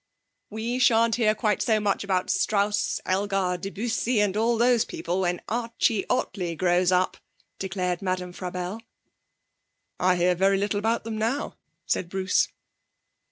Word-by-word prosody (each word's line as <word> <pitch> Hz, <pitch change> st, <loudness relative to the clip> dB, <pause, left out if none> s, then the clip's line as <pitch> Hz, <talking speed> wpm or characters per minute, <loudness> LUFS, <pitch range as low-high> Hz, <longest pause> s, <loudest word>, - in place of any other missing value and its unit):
'We 230 Hz, +4 st, -3 dB
shan't 230 Hz, -2 st, +4 dB
hear 215 Hz, -3 st, +3 dB
quite 210 Hz, -2 st, 0 dB
so 220 Hz, -2 st, +2 dB
much 205 Hz, -1 st, 0 dB
about 190 Hz, -2 st, 0 dB
Strauss, 205 Hz, 0 st, +1 dB
Elgar, 195 Hz, -1 st, 0 dB
Debussy 225 Hz, +4 st, -1 dB
and 205 Hz, -2 st, +1 dB
all 230 Hz, +2 st, +2 dB
those 240 Hz, 0 st, +4 dB
people 175 Hz, +3 st, -3 dB
when 175 Hz, -1 st, -1 dB
Archie 230 Hz, -2 st, 0 dB
Ottley 185 Hz, -9 st, -1 dB
grows 180 Hz, +1 st, +2 dB
up,' 185 Hz, +1 st, +1 dB, 0.4 s
declared 180 Hz, -2 st, -2 dB
Madame 185 Hz, -2 st, -2 dB
Frabelle. 180 Hz, +4 st, -5 dB, 1.2 s
'I 185 Hz, 0 st, +3 dB
hear 180 Hz, +1 st, +3 dB
very 195 Hz, +2 st, +2 dB
little 205 Hz, +1 st, 0 dB
about 225 Hz, +3 st, 0 dB
them 220 Hz, -1 st, -4 dB
now,' 235 Hz, +7 st, -1 dB, 0.3 s
said 170 Hz, +1 st, -1 dB
Bruce. 190 Hz, +1 st, +1 dB
200 Hz, 140 wpm, -26 LUFS, 185-225 Hz, 1.2 s, shan't